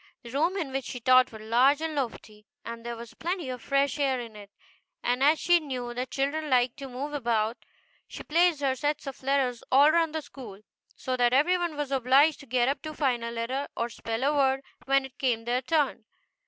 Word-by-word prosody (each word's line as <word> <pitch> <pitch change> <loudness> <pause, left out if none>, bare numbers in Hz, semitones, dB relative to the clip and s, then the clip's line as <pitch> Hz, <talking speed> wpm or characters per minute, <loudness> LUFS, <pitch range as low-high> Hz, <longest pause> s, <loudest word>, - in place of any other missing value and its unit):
The 235 - -10
room 330 +8 +1
in 315 -8 -3
which 270 0 -3
she 250 - -6
taught 255 +2 +5
was 220 -1 -10
large 250 +6 +4
and 320 0 -3
lofty, 220 -6 -5 0.2
and 230 0 -7
there 235 0 -5
was 230 0 -10
plenty 345 -4 -3
of 250 -2 -5
fresh 275 +3 0
air 270 -3 +1
in 230 -3 -8
it; 205 -1 -11 0.5
and 245 +1 0
as 300 +3 +5
she 350 +2 +4
knew 255 -6 -5
that 250 +1 -4
children 295 +3 -2
liked 250 -1 +2
to 275 -1 -7
move 275 +4 -5
about, 230 -4 0 0.5
she - - -9
placed 335 -1 +2
her 270 -2 +2
sets 295 +3 -2
of 275 -2 -7
letters 260 -3 0
all 285 +4 +6
round 325 -1 +1
the 315 - -2
school, 220 -9 -11 0.3
so 255 - -3
that 245 0 +3
every 305 +8 +4
one 345 -4 -2
was 290 -2 -3
obliged 270 +4 +4
to 280 - -13
get 245 0 +1
up 275 +1 -1
to 310 -1 -7
find 255 -6 0
a 235 - -3
letter, 235 +4 -3
or 235 - -1
spell 230 +1 -4
a 285 +2 +2
word, 270 -1 +2 0.2
when 275 0 +2
it 265 - -14
came 235 -4 0
their 245 +2 0
turn. 295 +2 0
265 Hz, 220 wpm, -27 LUFS, 240-290 Hz, 0.5 s, all